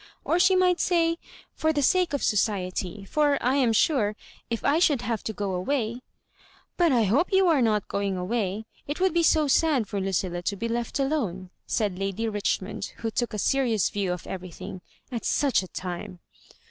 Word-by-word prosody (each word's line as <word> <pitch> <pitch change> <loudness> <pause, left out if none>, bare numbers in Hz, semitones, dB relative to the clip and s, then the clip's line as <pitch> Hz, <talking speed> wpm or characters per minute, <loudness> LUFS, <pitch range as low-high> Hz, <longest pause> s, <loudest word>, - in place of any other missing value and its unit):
Or 340 - +2
she 370 +1 +5
might 365 -1 +3
say, 335 -1 +2 0.4
*Fop 315 0 +1
the 290 - +1
sake 365 +4 +3
of 285 - -2
society;' 195 -2 -1
for, 290 +5 +2
I 255 +3 +1
am 250 -4 +3
sure, 220 -3 +2 0.3
if 230 -1 -3
I 300 +3 +3
should 290 -8 +3
have 230 -2 -2
to - - -1
go 200 -2 -3
away 225 +5 -1
^" 245 - -10 0.7
But 345 -3 +3
I 240 -3 +4
hope 240 - +2
you 380 -1 +4
are 315 -6 +4
not 215 -3 +1
going 200 -1 -1
away. 200 +2 -2 0.2
It 290 +4 -3
would 375 -1 +2
be 340 - +3
so 310 -2 +4
sad 275 -5 +2
for 200 0 -3
Lucilla 185 -2 -1
to 200 +3 -2
be 230 +4 -3
leftalene," 235 - -2 0.2
said 200 -4 -1
Lady 195 +3 -2
Richmond, 205 -1 -2
who 225 -1 -3
took 240 +2 -1
a 215 - -4
serious 230 -1 +1
view 200 -3 -1
of 180 -1 -5
eve 190 - -5
rything, 185 +1 -8
" - - -36
at 235 -2 -4
such 280 -7 +2
a 185 - -8
tune." 180 0 -6
230 Hz, 195 wpm, -26 LUFS, 195-290 Hz, 0.7 s, she